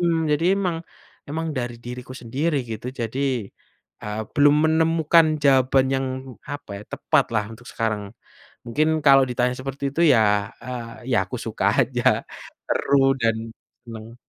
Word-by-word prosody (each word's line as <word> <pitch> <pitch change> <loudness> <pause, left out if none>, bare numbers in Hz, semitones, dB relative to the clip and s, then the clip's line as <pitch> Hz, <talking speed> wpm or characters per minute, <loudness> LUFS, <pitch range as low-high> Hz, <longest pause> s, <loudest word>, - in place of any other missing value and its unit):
Mmm, 165 -2 +1
jadi 150 +2 +1
emang 180 -4 -1 0.5
emang 160 +3 -3
dari 120 -2 -3
diriku 125 +1 -7
sendiri 140 +7 -1
gitu 110 +2 -6
jadi, 115 +3 -3 0.8
eee, 105 +1 -4
belum 145 -1 +5
menemukan 160 0 +4 0.2
jawaban 130 -1 +4
yang 135 0 0 0.4
apa 145 -6 -8
ya? - - -9
Tepatlah 110 -2 +1
untuk 120 +2 -14
sekarang, 110 -3 -2 0.6
mungkin 150 +7 +1 0.2
kalau 135 -1 +7
ditanya 125 0 0
seperti 135 +1 -6
itu 160 - -1
ya, 105 -3 +2
eee, 125 0 -7
ya 120 - +3
aku - - -5
suka - - -2 0.2
aja - - +1 0.4
seru 135 -1 +3
dan 115 -2 +2 0.5
senang. 115 -1 -10
130 Hz, 140 wpm, -23 LUFS, 115-145 Hz, 0.8 s, kalau